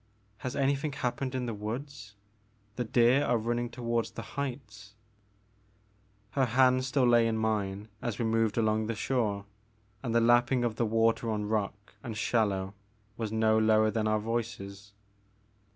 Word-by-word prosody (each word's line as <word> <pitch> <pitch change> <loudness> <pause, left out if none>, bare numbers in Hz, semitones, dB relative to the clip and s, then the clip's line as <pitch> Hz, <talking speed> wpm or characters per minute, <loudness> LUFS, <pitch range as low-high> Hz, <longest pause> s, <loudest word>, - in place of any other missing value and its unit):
Has 130 - -4
anything 140 +1 0
happened 130 +1 -2
in 125 -1 -1
the 115 - -3
woods? 110 +1 -6 0.6
The 125 - -1
deer 120 +4 +4
are 120 - +2
running 120 +2 -1
toward 115 -1 -1
the - - -8
heights/' 115 -8 -6 1.4
Her 135 -2 +2
hand 130 +1 +3
still 130 -1 +2
lay 120 -1 +5
in 110 -1 0
mine 105 -2 -1
as 120 -4 -3
we 115 - -1
moved 110 -1 +1
along 110 -1 +1
the 115 - -2
shore, 105 -4 -1 0.6
and 115 -3 -2
the - - +6
lapping 120 +2 +3
of 115 -2 -1
the 115 - +1
water 115 +1 +2
on 105 -1 -1
rock 105 -1 -3
and 110 -2 -5
shallow 100 -4 0 0.4
was 110 -2 -4
no 110 0 +3
lower 110 0 +4
than 110 -1 0
our 110 0 +2
voices. 105 -3 -4
115 Hz, 155 wpm, -29 LUFS, 110-120 Hz, 1.4 s, the